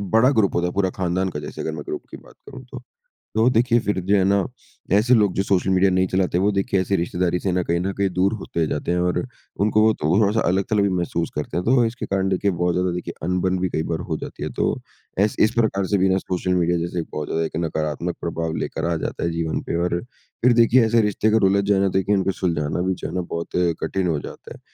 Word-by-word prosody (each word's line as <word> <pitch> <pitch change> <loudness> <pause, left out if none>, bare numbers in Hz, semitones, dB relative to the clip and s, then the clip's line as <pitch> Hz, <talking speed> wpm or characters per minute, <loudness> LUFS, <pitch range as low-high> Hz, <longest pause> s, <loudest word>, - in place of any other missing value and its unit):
बड़ा 120 +3 +6
ग्रुप 110 -8 +2
होता 85 0 +1
है 90 - -4
पूरा 95 -1 +1
खानदान 95 +1 0
का 75 - -5
जैसे - - -7
अगर 80 - -3
मैं 75 -1 -6
ग्रुप - - -4
की - - -8
बात - - -18
करूँ 130 -1 -10
तो। 130 -2 -8 0.5
तो 110 +3 +4
देखिए 120 0 +3
फिर 105 -3 -1
जो 100 +2 +3
है 95 - +3
ना, 100 -1 +2 0.5
ऐसे 110 +5 +4
लोग 105 -4 +3
जो 95 - +1
सोशल 95 -1 +1
मीडिया 95 +1 +4
नहीं 95 0 +2
चलाते 90 -1 0
वो 100 +3 +2
देखिए 100 0 0
ऐसे 95 +1 0
रिश्तेदारी 90 0 0
से 95 - -1
न 90 0 0
कहीं 85 0 0
न 95 +2 -1
कहीं 100 -1 +1
दूर 95 +4 +2
होते 85 -5 -2
जाते 75 +3 -2
हैं 90 - +1
और 90 0 +1 0.5
उनको 110 0 +3
वो 110 0 +5
तो 75 - -3
वो 85 +4 +3
थोड़ा-सा 105 +2 +2
अलग-थलग 100 +3 +1
भी 100 - +2
महसूस 85 -2 -1
करते 75 +3 -3
हैं, 90 - -1
तो 125 0 +4
इसके 115 +2 -4
कारण 95 0 0
देखिए 95 +1 +1
बहुत 90 0 0
ज़्यादा 90 0 +1
देखिए 90 - -5
अनबन 90 0 0
भी 95 0 0
कई 80 - -1
बार 80 -1 -3
हो - - -1
जाती - - -7
है, - - -2
तो - - 0 0.4
ऐसे 105 +2 +2
इस 110 - +3
प्रकार 110 -4 +1
से 100 - +1
बिना 95 0 +3
सोशल 90 -1 -2
मीडिया 85 0 +2
जैसे 85 +1 -3
एक 80 - -4
बहुत 75 -1 -3
ज़्यादा 80 0 0
एक 80 - -5
नकारात्मक 80 +2 -2
प्रभाव 80 -1 -3
लेकर 80 - -3
आ - - +1
जाता - - -4
है 85 - 0
जीवन 80 -1 -2
पे, - - -4
और 85 0 0 0.4
फिर 125 0 +6
देखिए 120 +1 +5
ऐसे 115 +1 +3
रिश्ते 105 0 0
अगर 110 -2 +4
उलझ 100 0 +2
जाएँ 100 -1 +4
ना 100 - +3
देखिए 100 +2 +2
उनको 95 0 +1
सुलझाना 85 -3 0
भी 95 - +1
जो - - -6
है 85 - -7
न - - -8
बहुत 85 0 -3 0.3
कठिन 95 -2 -1
हो 80 -4 0
जाता - - -10
है। - - -15
95 Hz, 260 wpm, -22 LUFS, 85-100 Hz, 0.5 s, बड़ा